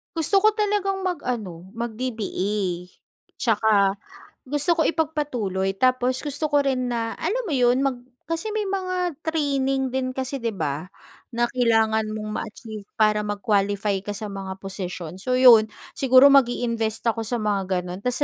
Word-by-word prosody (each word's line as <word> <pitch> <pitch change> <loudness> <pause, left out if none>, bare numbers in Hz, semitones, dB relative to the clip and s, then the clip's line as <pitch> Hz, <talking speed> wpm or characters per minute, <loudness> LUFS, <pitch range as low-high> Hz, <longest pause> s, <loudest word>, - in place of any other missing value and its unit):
Gusto 330 +5 +2
ko 430 - +6
talagang 410 -2 0
mag-ano 220 - -4
mag-DBA, 210 -6 -3 0.5
tsaka 205 -4 +2 0.4
gusto 295 +6 +1
ko 330 - 0
ipagpatuloy, 290 - -1
tapos 255 +1 +2
gusto 290 +1 -2
ko 290 -1 +2
rin 255 -2 0
na, 230 -1 -2
alam 445 +9 -1
mo 335 - -2
yun, 245 -1 +3
mag 255 -3 -1 0.2
kasi 330 +8 -3
may 425 0 -2
mga 365 -5 -2
training 275 -4 0
din 260 -1 -1
kasi, 265 +1 -4
'di 230 - 0
ba? 160 -3 -3 0.4
Na 240 +1 +1
kailangan 225 -3 +2
mong 215 0 -5
ma-achieve 215 -2 -9
para 215 -1 +3
mag-qualify 205 -1 0
ka 205 +1 -5
sa 215 - -5
mga 195 -2 -6
position. 185 -4 -6
So 255 +2 0
'yon, 230 -4 +7 0.2
siguro 260 0 +6
magi-invest 235 -4 +1
ako 230 0 +1
sa 235 +2 -2
mga 195 -4 -1
ganun. 180 +2 -7
Tapos 250 +2 -1
240 Hz, 150 wpm, -24 LUFS, 205-280 Hz, 0.5 s, yon